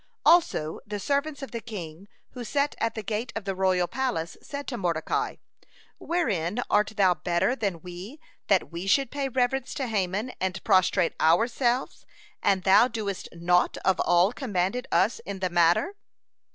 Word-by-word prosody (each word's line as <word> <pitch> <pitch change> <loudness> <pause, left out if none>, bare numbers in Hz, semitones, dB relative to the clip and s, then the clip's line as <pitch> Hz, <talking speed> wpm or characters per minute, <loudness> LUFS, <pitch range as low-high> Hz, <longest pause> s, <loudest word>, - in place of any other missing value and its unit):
(101) 315 - +8
Also 160 - +1
the 205 0 -5
servants 285 +5 -1
of 270 - -7
the 235 - -4
king 190 -5 -8 0.2
who 250 - -7
sat 280 +5 0
at 230 0 -1
the 220 - -4
gate 220 +4 -3
of 225 -3 -4
the 195 - -1
royal 185 -1 +1
palace 235 -11 -2
said 285 0 -7
to 255 - -3
Mordecai: 170 -7 -1 0.6
"Wherein 230 - -1
art 210 +1 +2
thou 190 -3 +5
better 175 +8 0
than 195 -9 -3
we, 185 - -9 0.3
that 195 -4 +2
we 170 +3 -5
should 270 +5 +2
pay 280 -1 -2
reverence 260 +1 -1
to 270 - -2
Haman 210 +1 -1
and 190 0 -2
prostrate 185 -1 +3
ourselves, 235 - +1 0.3
and 190 -2 +2
thou 200 +5 +6
doest 215 -5 -4
naught 175 +1 +1
of 190 -1 +3
all 175 +5 +3
commanded 240 0 -2
us 230 - +2
in 200 -1 -6
the 185 -1 -2
matter?" 175 - +3
205 Hz, 165 wpm, -26 LUFS, 180-250 Hz, 0.6 s, 101